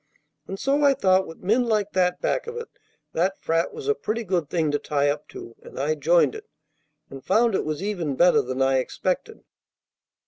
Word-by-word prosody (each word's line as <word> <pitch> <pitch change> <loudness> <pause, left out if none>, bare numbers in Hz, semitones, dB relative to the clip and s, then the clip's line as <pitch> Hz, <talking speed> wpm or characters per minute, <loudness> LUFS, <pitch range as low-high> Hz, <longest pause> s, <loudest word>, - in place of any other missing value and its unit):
And 195 - -6
so 280 +2 +1
I 280 -1 +5
thought 190 -6 +2
with 165 - -12
men 225 +6 +2
like 210 -3 0
that 180 -1 +1
back - - -1
of 470 0 -6
it 470 - -6 0.4
that 185 +4 0
frat 165 +1 0
was 440 -2 -8
a 430 - +4
pretty 230 - -3
good 180 -7 -1
thing 160 -4 0
to 145 - 0
tie 145 -1 0
up 150 +1 -3
to, 115 - -10
and - - -10
I 145 +3 +1
joined 165 - +3
it, 435 0 -10 0.6
and 135 -1 -9
found 225 +3 +2
it - - 0
was 155 +3 -3
even 175 -9 -2
better 175 +5 +5
than 130 +1 -2
I 135 0 +3
expected. 185 - -3
185 Hz, 205 wpm, -24 LUFS, 150-230 Hz, 0.6 s, I